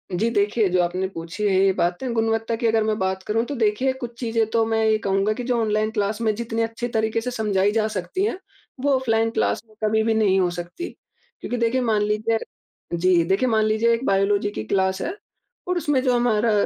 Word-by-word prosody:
जी 220 +6 +1
देखिए, 210 0 +2
जो 180 0 +2
आपने 180 +2 -1
पूछी 165 +5 -6
है 195 - +2
ये 195 - +4
बातें 180 +8 -1
गुणवत्ता 225 0 0
की 230 +1 0
अगर 225 -1 +2
मैं 215 0 0
बात 190 0 -1
करूँ, 225 +3 0
तो 285 - -5
देखिए 235 +3 +1
कुछ 245 -2 -7
चीज़ें 230 -2 +1
तो 225 0 +2
मैं 225 0 0
ये 220 0 +3
कहूँगा 195 0 0
कि 245 - -5
जो 245 0 0
ऑनलाइन 215 0 +1
क्लास 210 0 -1
में 220 -2 +2
जितनी 230 0 -3
अच्छी 230 +2 -2
तरीके 220 -1 0
से 250 +2 -3
समझाई 205 -4 +1
जा 215 0 +1
सकती 215 - -3
है, 425 - -1 0.4
वो 280 +2 +1
ऑफलाइन 225 -3 +1
क्लास - - 0
में 215 - -23
कभी 220 +1 +2
भी 225 - +2
नहीं 205 -3 +3
हो 180 -1 +2
सकती 175 - -6 0.5
क्योंकि 245 - -3
देखिए 235 +2 +1
मान 220 -4 +1
लीजिए 215 +2 +1 0.6
जी, 175 0 +3
देखिए 195 +9 +1
मान 220 -1 +2
लीजिए 220 +2 +2
एक 230 +3 -2
बायोलॉजी 200 0 +2
की 110 - -5
क्लास 190 - 0
है 345 - -2 0.5
और 360 0 0
उसमें 295 -5 +1
जो 255 -2 +2
हमारा 235 -2 +2
220 Hz, 220 wpm, -23 LUFS, 200-230 Hz, 0.6 s, ये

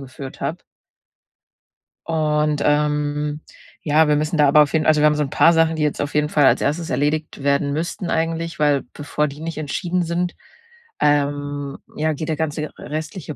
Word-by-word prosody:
geführt 135 0 -9
habe. - - -3 1.5
Und, 150 -2 +1
ähm, 150 0 0 0.4
ja, 155 +1 +3
wir 150 - +3
müssen 155 +2 -1
da 145 -1 +5
aber 150 +2 +6
auf 145 - -5
jeden 155 -1 +1
also, 155 -1 +4
wir - - +5
haben 150 0 +4
so 150 - +1
'n 135 - -4
paar 165 +3 +5
Sachen, 165 0 +3
die 155 - -1
jetzt 150 - 0
auf 145 - -3
jeden 150 0 +2
Fall 145 -3 +3
als - - +4
1. 160 +3 -1
erledigt 145 +2 -1
werden 140 0 +1
müssten 170 +3 -3
eigentlich, 165 0 -2
weil 145 -2 +2
bevor 150 0 -2
die 140 +2 -9
nicht 165 -1 -5
entschieden 175 +4 -2
sind, 175 +1 -2 0.6
ähm, 145 -1 0 0.2
ja, 155 +1 0
geht 155 +2 -5
der 155 - 0
ganze 155 -1 -2
r 155 - -7
restliche 155 0 -6
150 Hz, 190 wpm, -21 LUFS, 145-160 Hz, 1.5 s, aber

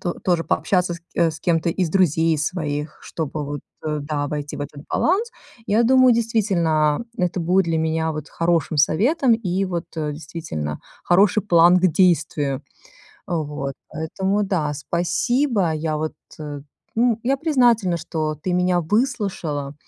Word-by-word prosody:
то 175 - -2
тоже 175 -3 0
пообщаться 180 -2 +1
ск 170 - -12
э, 170 -1 +3
с 160 - -9
кем-то 170 -1 +1
из 180 0 -1
друзей 165 -2 +2
своих, 150 -2 -3
чтобы 155 -2 -4
вот, 145 0 -5 0.2
э, 150 -1 -2
да, 145 -1 -2
войти 145 0 -4
в - - -8
этот 145 0 -8
баланс. 425 +8 +1 0.4
Я 220 +3 +3
думаю, 255 0 +6
действительно, 190 -8 +1
это 180 -2 -1
будет 180 +2 +2
для 165 -1 0
меня 160 0 0
вот 155 0 -6
хорошим 165 -2 0
советом 235 - +3
и 195 -3 -1
вот, 175 -3 -3
э, 150 -2 -2
действительно, 150 - -5 0.2
хороший 195 +3 +4
план 175 -1 +6
к 185 - +3
действию. 155 -6 +1 0.6
Вот. 150 -4 -3
Поэтому, 190 +6 -1
да, 160 -7 -1
спасибо. 190 - 0
Я 155 0 -2
вот, 155 +1 -3 0.3
э, 145 -2 -6 0.3
н 235 -1 +3
я 270 +3 +1
признательна, 240 - +2
что 155 -1 -3
ты 180 +4 -4
меня 180 0 +2
выслушала, 180 - -1
170 Hz, 150 wpm, -22 LUFS, 155-195 Hz, 0.6 s, думаю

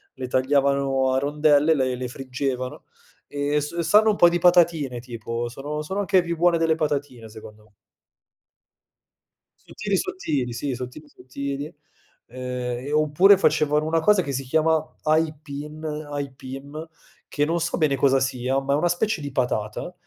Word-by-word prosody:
le 130 -1 -5
tagliavano 135 0 +1
a 130 - +2
rondelle, 150 +2 +3
le 130 -3 0
le 125 0 -4
friggevano 130 0 -4 0.4
e 145 +1 -1
s 150 +4 -6
sanno 210 +7 +4
un 210 - +2
po' 175 - +7
di 175 0 +2
patatine, 165 -7 +3
tipo, 115 -1 -5
sono 145 +5 -5
sono 190 +6 -3
anche 190 -2 +3
più 170 -1 -3
buone 175 +1 +3
delle 165 -1 +2
patatine 145 -7 -3
secondo 105 0 -13
me. 105 - -26 1.9
Sottili, 205 -2 -2
sottili, 145 - -2
sì, 130 +3 -3
sottili, 125 +5 -8
sottili, 140 +2 -6 0.6
ehm, 125 0 -5
e - - -4
oppure 155 +6 +5
facevano 150 -3 +2
una 165 +1 +1
cosa 205 +3 +4
che 140 -5 -4
si 135 +1 -3
chiama 160 +3 0
aipin 155 -1 -2
aipim 145 0 -6 0.4
che 145 - -1
non 165 +3 0
so 170 +1 -2
bene 150 -4 +2
cosa 135 0 +3
sia, 130 0 0
ma 140 +1 -1
è - - +4
una 175 +4 +1
specie 190 +3 0
di 145 -1 -5
patata, 125 +4 -2
145 Hz, 155 wpm, -23 LUFS, 130-160 Hz, 1.9 s, po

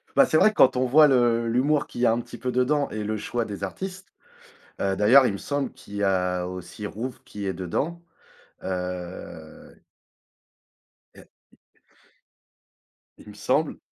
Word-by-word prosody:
Bah, 275 - +7
c'est 155 - +2
vrai 215 +5 +5
quand 130 -7 +5
on 130 - +2
voit 150 +4 +6
le 120 -3 +2
l'humour 140 +5 +1
qu'il 120 - -7
y - - +4
a - - +5
un 120 +1 0
petit - - -11
peu 125 - -3
dedans 140 +4 +1
et 105 0 -4
le 110 +1 -2
choix 120 +2 -3
des 100 -2 -7
artistes, 185 - -6 0.7
heu, 95 -1 +1
d'ailleurs 125 +7 +6
il 100 - -1
me - - -4
semble 145 +4 -3
qu'il 105 - -13
y 100 - -2
a 90 -2 +1
aussi 90 +3 -8
Rouve 120 +6 -6
qui 100 -1 -7
est 95 - -1
dedans. 140 - -3 0.6
Heu 90 -3 -6 1.4
Et - - -16 1.9
Il - - -14
me - - -11
semble - - 0
115 Hz, 165 wpm, -25 LUFS, 95-135 Hz, 1.9 s, Bah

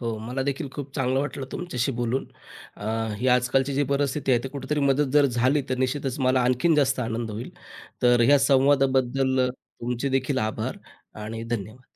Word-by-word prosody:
हो, 115 -2 -2
मला 125 +5 -3
देखील 140 0 -2
खूप 140 -2 -7
चांगलं 130 0 +1
वाटलं 140 -2 -4
तुमच्याशी 135 -8 -2
बोलून. 120 +2 -2 0.5
अ, 105 - -9 0.3
ही 130 - +1
आजकालची 125 +2 +2
जी 145 - +2
परिस्थिती 140 0 0
आहे, 120 -1 +2
ते - - -3
कुठेतरी 140 +2 -3
मदत 140 0 +2
जर 145 -1 +5
झाली 130 +3 +1
तर 130 - -1
निश्चितच 130 +1 -1
मला 130 0 +3
आणखीन 130 +7 +2
जास्त 135 -3 +2
आनंद 115 -1 -3
होईल. 110 +4 -6 0.5
तर 120 -1 +5
ह्या 145 +2 +6
संवादाबद्दल 135 -1 +3
अ, - - -2
तुमचे 125 +1 -5
देखील 135 +1 0
आभार 110 -2 -3 0.5
आणि 115 +1 -5
धन्यवाद. 115 +1 -5
130 Hz, 175 wpm, -25 LUFS, 120-140 Hz, 0.5 s, ह्या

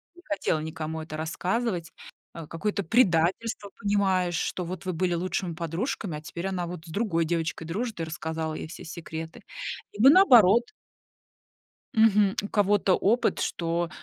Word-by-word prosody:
не 350 - -16
хотела 300 - -1
никому 160 0 -4
это 155 -1 -7
рассказывать. 175 +2 -2 0.4
А, 165 - -7
какое-то 200 +5 -2
предательство 195 +1 +2
понимаешь, 190 -3 +1
что 180 - -2
вот 180 +1 -6
вы 185 - -1
были 175 +1 0
лучшими 180 0 -2
подружками, 170 - -3
а - - -9
теперь 170 +4 -5
она 180 -3 -2
вот 175 -2 -7
с - - -12
другой 170 -4 0
девочкой 165 0 -2
дружит 220 +4 -3
и 165 - -1
рассказала 160 0 -4
ей 155 - -5
все 165 - -10
секреты. 160 -1 -7 0.5
Либо 225 +7 +6
наоборот. 240 - +6 1.3
Мгм, 210 -3 +4
у - - -3
кого-то 205 -2 +3
опыт, 230 +5 +2
что, 170 0 -1
180 Hz, 150 wpm, -27 LUFS, 165-205 Hz, 1.3 s, Либо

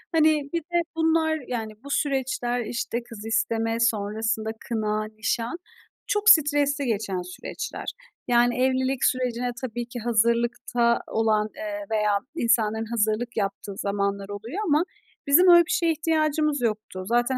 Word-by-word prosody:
Hani, 310 -2 +3
bir 335 - +1
de 345 +2 0
bunlar, 320 -1 +2
yani, 225 -3 -4
bu 280 - -9
süreçler, 260 -4 -1
işte, 235 +1 -3
kız 230 -3 -10
isteme, 225 0 0
sonrasında 220 0 0 0.2
kına, 215 -2 -1
nişan 225 +6 -3 0.5
çok 415 +1 +3
stresli 290 -5 +4
geçen 205 -5 -1
süreçler. 180 +1 -7 0.4
Yani, 240 0 +3
evlilik 260 0 +1
sürecine 250 -1 0
tabii 240 -1 -4
ki 240 +1 -7
hazırlıkta 235 +1 +1
olan, 215 -1 +1
eee, 310 0 -5
veya 210 -2 +2 0.2
insanların 225 -5 +1
hazırlık 225 +1 -1
yaptığı 200 0 -2
zamanlar 200 0 -2
oluyor 220 - -6
ama 300 +2 +3 0.4
bizim 335 +7 +6
öyle 345 -1 +8
bir - - -5
şeye 335 -1 +2
ihtiyacımız 310 -2 +1
yoktu. 215 -4 -2
Zaten 240 +3 +1
240 Hz, 135 wpm, -25 LUFS, 220-285 Hz, 0.5 s, öyle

